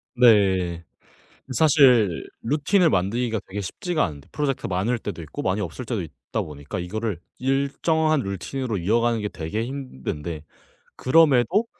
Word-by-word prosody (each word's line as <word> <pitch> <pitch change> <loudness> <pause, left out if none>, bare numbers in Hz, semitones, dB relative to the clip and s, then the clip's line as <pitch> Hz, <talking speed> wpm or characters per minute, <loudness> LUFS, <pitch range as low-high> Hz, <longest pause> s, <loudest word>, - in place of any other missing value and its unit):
네. 95 -8 +4 0.7
사실 125 - +4 0.2
루틴을 150 - +2
만들기가 110 +4 0
되게 105 +2 -5
쉽지가 155 - -1
않은데 75 -5 -7
프로젝트가 140 -7 -2
많을 100 +7 0
때도 100 -5 -6
있고 80 - -6
많이 95 +3 0
없을 100 +6 -5
때도 110 -4 -2
있다 80 -5 -5
보니까 70 +1 -7
이거를 100 0 -3 0.2
일정한 140 +4 +1
루틴으로 110 +3 -3
이어 105 +7 +2
가는 115 -1 +1
게 105 - -2
되게 90 +7 -4
힘든데 85 - -5 0.5
그럼에도 145 - +4
110 Hz, 325 characters per minute, -24 LUFS, 90-135 Hz, 0.7 s, 네